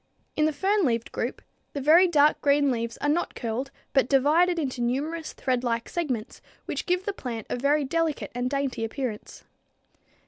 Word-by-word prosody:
In 305 - +2
the 310 - +2
fern 390 +7 +1
leaved 230 -5 0
group - - -4 0.3
the 285 - -3
very 320 +7 +6
dark 300 -3 +3
green 285 -1 +3
leaves 235 -1 -3
are - - 0
not 320 +4 0
curled 240 +4 -3 0.2
but 270 -2 +3
divided 315 +6 +4
into 265 -6 -2
numerous 300 +7 -2
threadlike 240 -3 -1
segments 260 -11 -3 0.2
which - - -4
give 360 +1 0
the 410 - -1
plant 235 - -6
a - - +1
very 285 +4 +2
delicate 325 +2 -1
and 245 +1 -1
dainty 275 -4 -2
appearance. 225 -1 -5
280 Hz, 170 wpm, -26 LUFS, 245-315 Hz, 0.3 s, very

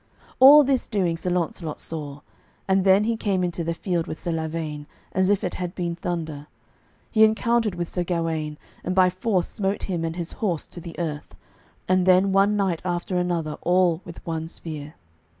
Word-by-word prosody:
All 285 +3 +10
this 270 -2 0
doing 185 -6 0
Sir 175 +2 -3
Launcelot 170 -3 -2
saw, 150 -3 -6 0.5
and 190 0 +3
then 195 +2 +5
he 230 +1 0
came 195 -4 0
into 175 -1 -2
the 165 0 -2
field 175 -2 -2
with 160 - -6
Sir 170 - -2
Lavaine, 160 -2 -4 0.2
as 185 +1 +2
if 205 -1 +2
it - - -2
had 180 0 -4
been 170 -2 -2
thunder. 160 -4 -4 0.6
He 220 - +5
encountered 220 -1 +2
with 175 -1 -3
Sir 180 - -2
Gawaine, 165 -3 -2 0.3
and 180 - -2
by 185 -1 +5
force 185 -1 0
smote 195 0 -2
him 175 -4 -2
and 165 0 -2
his 170 -1 -4
horse 180 -8 -2
to 175 - -11
the 165 0 -9
earth, 155 -4 -4 0.5
and 185 0 +2
then 185 +1 +5
one 195 +2 +4
knight 190 -5 0
after 180 0 -2
another 170 -4 -2
all 180 -1 +2
with 170 - -11
one 160 -1 -3
spear. 155 -3 -8
175 Hz, 185 wpm, -24 LUFS, 165-190 Hz, 0.6 s, All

